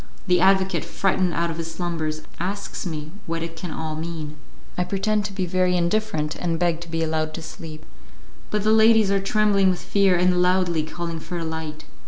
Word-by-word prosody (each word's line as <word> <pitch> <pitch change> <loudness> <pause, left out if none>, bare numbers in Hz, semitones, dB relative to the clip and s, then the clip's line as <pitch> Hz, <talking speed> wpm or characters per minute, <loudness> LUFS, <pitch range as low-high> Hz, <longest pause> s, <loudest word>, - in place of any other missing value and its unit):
The 180 -2 +3
advocate, 190 0 +3
frightened 185 -2 0
out 170 0 0
of 165 - -6
his 165 0 -3
slumbers, 165 -2 -3 0.2
asks 195 +1 -3
me 155 -2 -5 0.2
what 165 0 -2
it 165 0 -6
can 175 +2 -6
all 155 0 -4
mean; 155 -2 -5 0.4
I 180 - +1
pretend 205 +3 0
to 205 - -3
be 190 -1 -2
very 180 0 +2
indifferent, 170 -4 0
and 170 -2 -1
beg 170 -1 +1
to 170 - -8
be 165 0 -1
allowed 155 -1 -1
to 165 - -6
sleep. 155 -1 -9 0.6
But 210 -1 0
the 215 +1 +4
ladies 220 -2 +5
are 195 0 +2
trembling 200 -1 +3
with 180 - 0
fear, 195 -2 +3
and 180 0 +3
loudly 180 -2 +2
calling 165 +1 -4
for 175 +2 -5
a 165 - -3
light. 160 -1 -5
175 Hz, 200 wpm, -24 LUFS, 160-190 Hz, 0.6 s, ladies